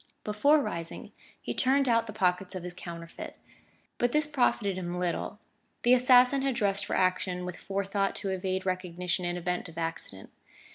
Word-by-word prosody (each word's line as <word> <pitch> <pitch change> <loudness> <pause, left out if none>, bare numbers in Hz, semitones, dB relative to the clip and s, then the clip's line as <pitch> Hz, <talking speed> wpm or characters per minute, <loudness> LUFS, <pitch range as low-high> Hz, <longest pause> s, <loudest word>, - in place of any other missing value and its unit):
Before 280 +9 +4
rising 165 -6 -5 0.3
he - - -4
turned 270 +1 +3
out 230 -1 +3
the - - -5
pockets 190 -1 0
of 185 - -5
his 180 0 -5
counterfeit. 170 -1 -8 0.6
But 245 0 +2
this 300 0 +4
profited 245 -8 +1
him 180 -1 -4
little: 180 +3 -2 0.5
the 245 - +6
assassin 255 +1 +6
had 270 -2 0
dressed 205 -4 +1
for - - -1
action 185 -1 +1
with 180 -1 -5
forethought 195 +1 -1
to 195 - -3
evade 190 0 -2
recognition 180 -1 -2
in 175 0 -1
event 180 0 -2
of 165 - -14
accident. 165 - -5
190 Hz, 170 wpm, -29 LUFS, 180-235 Hz, 0.6 s, the